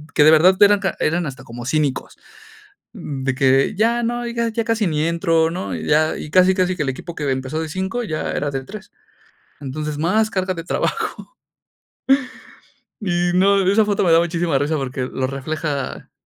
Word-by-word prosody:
Que 150 - +5
de 155 - +7
verdad 180 +4 +6
eran 205 0 +6 0.2
eran 170 +2 0
hasta 135 -1 -8
como 120 -1 -9
cínicos. 145 0 -1 0.8
De 135 - -3
que 135 +6 +2
ya 230 +3 +2
no, 240 +1 -2
y 235 - -5
ya 230 -1 -1
casi 225 -3 +1
ni 155 -1 0
entro, 165 -1 +1
¿no? 180 +3 -4
Y - - -5
ya 155 +1 +2
y - - -7
casi 185 +2 +5
casi 185 -1 0
que 160 - -1
el 135 - -1
equipo 165 +6 -8
que 145 -4 -2
empezó 130 +3 -3
de 160 - -4
5 190 +8 -3
ya 155 -7 -3
era 145 - -2
de 135 -1 -4
3 205 +6 -10 0.7
Entonces, 150 +2 -5
más 215 +7 +1
carga 185 -1 -1
de 165 - -7
trabajo - - -2 1.9
Y 175 -3 0
no, 195 +1 +3
esa 205 +3 +4
foto 205 -1 0
me 175 - +3
da 165 - +6
muchísima 170 -3 0
risa 145 +3 0
porque 130 -2 -3
lo 130 0 -3
refleja 140 +1 -4
165 Hz, 185 wpm, -20 LUFS, 145-190 Hz, 1.9 s, de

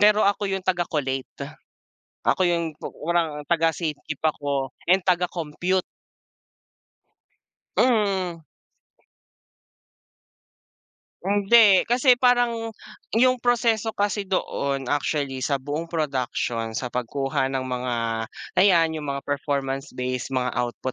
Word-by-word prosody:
pero 210 +1 +6
ako 200 +1 +1
yung 195 0 -1
taga-collate, 150 -7 -2 0.8
ako - - +2
yung 170 -2 0
pi 150 - -7 0.2
parang 165 -4 0
taga 165 +1 +2
safekeep 155 -3 -4
ako 140 -3 -1 0.2
and 185 0 +4
taga-compute. 180 0 0 1.9
Hmm. 195 -8 +2 2.9
Hindi 205 0 +5
kasi 250 +2 +5
parang, 240 -2 +2 0.5
yung 255 +1 +4
proseso 230 -3 +2
kasi 205 -1 -1
doon 140 -7 -1
actually 140 -2 -1
sa 140 +3 +1
buong 145 +5 -4
production, 125 -7 -2
sa 125 -2 -3
pagkuha 135 +3 -1
ng 135 -1 -2
mga 125 -1 -2 0.7
ayan 165 -5 +4
yung 150 - -6
mga 140 - -7
performance 140 -1 -2
based, 125 -1 -2
mga 130 -1 -1
output 125 +1 -2
160 Hz, 105 wpm, -24 LUFS, 135-195 Hz, 2.9 s, pero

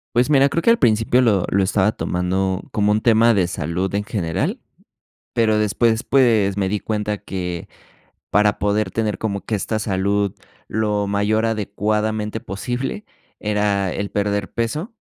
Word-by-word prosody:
Pues 125 +3 +3
mira, 140 -2 +5
creo 165 +4 -1
que - - +2
al 230 - +5
principio 115 +1 +3
lo 100 -6 +3
lo 100 0 +2
estaba 100 +1 +2
tomando 95 0 -1
como 105 0 +1
un 105 +1 +2
tema 115 0 +5
de 95 -4 +2
salud 90 +3 -3
en 105 - 0
general, 85 -7 -2 0.7
pero 110 -2 +2
después, 110 +3 +1
pues, 110 -7 +3
me 95 -1 +1
di 105 +1 -1
cuenta 105 -1 -2
que, 90 -4 -5 0.7
para 105 0 +3
poder 105 +1 0
tener 110 -2 -2
como 100 -3 -2
que 110 - -4
esta 110 +2 -1
salud 100 -1 0 0.3
lo 105 -1 0
mayor 105 +2 +1
adecuadamente 105 0 -1
posible, 125 - -4 0.3
era 105 -3 0
el 100 0 -3
perder 100 -1 -1
peso. 150 - -3
105 Hz, 155 wpm, -21 LUFS, 100-110 Hz, 0.7 s, mira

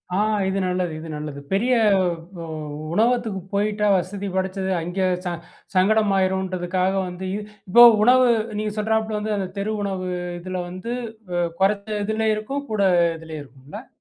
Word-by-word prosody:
ஆ - - +1 0.3
இது 190 +1 0
நல்லது, 180 -2 -1
இது 165 - -8
நல்லது. 150 -1 -6
பெரிய 240 +6 +2 0.7
வ - - -6 0.5
உணவகத்துக்கு 225 -2 +1
போயிட்டா, 210 +1 +1
வசதி 195 +2 -2
படைச்சது. 190 0 -1
அங்கே 185 +3 -1 0.2
ச 175 - -1 0.4
சங்கடமாகிடும்ன்றதுக்காக 190 -2 +2
வந்து 180 +1 -6 0.4
இப்போ 240 +5 +9 0.2
உணவு 250 +1 +6 0.3
நீங்க 215 -1 -2
சொல்கிறாப்ல 220 0 0
வந்து 210 0 -1
அந்த 190 -2 -3
தெரு 210 +2 -1
உணவு, 190 -2 -3 0.3
இதில 185 +1 -6
வந்து 185 +7 -5 0.4
வ 175 - +1 0.2
குறைச்ச 200 +2 +2 0.2
இதுல 220 +1 0
இருக்கும், 275 +7 -4
கூட 210 -2 0 0.4
இதுலேயும் 160 -2 -8
இருக்கும்ல? 135 +3 -12
195 Hz, 135 wpm, -23 LUFS, 180-215 Hz, 0.7 s, இப்போ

